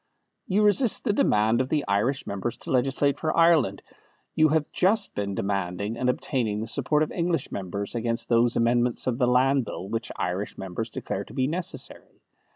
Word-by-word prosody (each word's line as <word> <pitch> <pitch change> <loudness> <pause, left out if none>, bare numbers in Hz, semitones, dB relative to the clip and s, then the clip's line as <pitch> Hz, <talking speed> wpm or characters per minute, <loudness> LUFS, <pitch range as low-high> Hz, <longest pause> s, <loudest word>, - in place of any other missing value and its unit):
"You 200 +3 +2
resist 210 +3 +3
the 210 - +1
demand 110 - +3
of 130 - -3
the 150 -2 0
Irish 120 +8 0
members 100 +4 -4
to - - -7
legislate 135 +2 +1
for 160 0 -1
Ireland; 165 -5 +3 0.5
you 155 - +4
have 155 0 +1
just 200 +2 +2
been 100 -1 -3
demanding, 100 +2 -2
and 125 +1 0
obtaining, 115 -4 -1
the 110 - -3
support 140 +6 +1
of 155 - -4
English 170 -4 -1
members 100 +1 -4
against 115 0 -1
those 120 0 +3
amendments 120 +1 +1
of 125 -1 -1
the 125 - +3
Land 130 +2 +3
Bill 95 -3 -6
which 115 +3 -3
Irish 90 +4 -3
members 95 +4 -5
declare 100 -2 -4
to - - -13
be 130 -2 +1
necessary. 170 +5 -5
125 Hz, 180 wpm, -26 LUFS, 105-150 Hz, 0.5 s, you